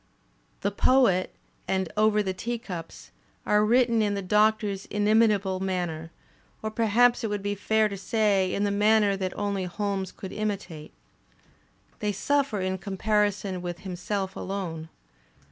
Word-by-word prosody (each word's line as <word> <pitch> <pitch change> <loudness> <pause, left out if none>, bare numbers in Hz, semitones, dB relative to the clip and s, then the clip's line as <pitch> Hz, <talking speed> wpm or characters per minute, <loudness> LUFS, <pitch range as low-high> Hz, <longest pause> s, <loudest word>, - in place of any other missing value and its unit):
"The 200 - 0
Poet" 205 -4 +3 0.4
and 190 -3 -1
"Over 215 0 +3
the 190 -1 -2
Teacups" 200 -6 -6 0.3
are 210 0 +3
written 235 0 +3
in 205 -1 +1
the 200 - -3
Doctor's 210 0 +1
inimitable 205 -2 +2
manner, 175 -4 -3 0.5
or 220 - -2
perhaps 235 +2 +3
it - - 0
would 205 -1 -3
be 205 0 -1
fair 215 +2 +2
to 200 - -5
say 200 -2 +1
in 200 - -1
the 205 - +1
manner 210 0 +3
that 190 -1 -4
only 200 -2 -1
Holmes 195 0 -3
could 190 - -9
imitate. 200 -7 -4 1.1
They 210 -1 -1
suffer 275 0 0
in 185 0 -2
comparison 205 -1 0
with 175 -1 -5
himself 190 +1 -4
alone. 170 -5 -5
205 Hz, 140 wpm, -26 LUFS, 190-215 Hz, 1.1 s, Poet